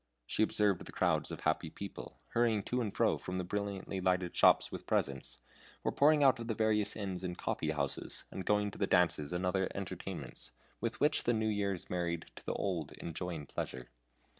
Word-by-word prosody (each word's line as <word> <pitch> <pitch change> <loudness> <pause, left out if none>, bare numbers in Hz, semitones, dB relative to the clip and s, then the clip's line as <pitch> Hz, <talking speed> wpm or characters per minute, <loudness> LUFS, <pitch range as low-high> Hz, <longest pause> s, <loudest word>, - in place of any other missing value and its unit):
She - - -1
observed 105 -3 +3
the - - -8
crowds - - +1
of - - -6
happy 80 +1 +1
people, 100 +4 -8
hurrying 115 -3 +2
to 125 +4 0
and 110 -4 -1
fro - - +2
from 90 0 -4
the 90 - -1
brilliantly 100 0 -3
lighted 90 -1 +1
shops - - +5
with - - -7
presents, 70 -1 -1 0.5
or - - +1
pouring 150 +1 +5
out 130 -3 +5
of 115 - -5
the 115 - -1
various 110 -1 +2
inns 95 -3 -4
and 90 -1 -3
coffee 80 - -1
houses, 70 -3 -1
and 95 - -4
going 105 0 +2
to - - -11
the 100 - +2
dances 85 -5 +3
and 90 +1 -1
other 95 +1 +1
entertainments 100 -9 -5 0.3
with 115 +1 -2
which 150 +1 +3
the 120 - +4
New 110 -1 +1
Year 100 -2 0
is 90 - -9
married 85 -2 -1
to - - -11
the - - -2
Old 85 -7 -2
in 85 - -6
joy 90 +2 -3
and 75 -3 -7
pleasure. 60 -1 -5
95 Hz, 210 wpm, -34 LUFS, 85-105 Hz, 0.5 s, shops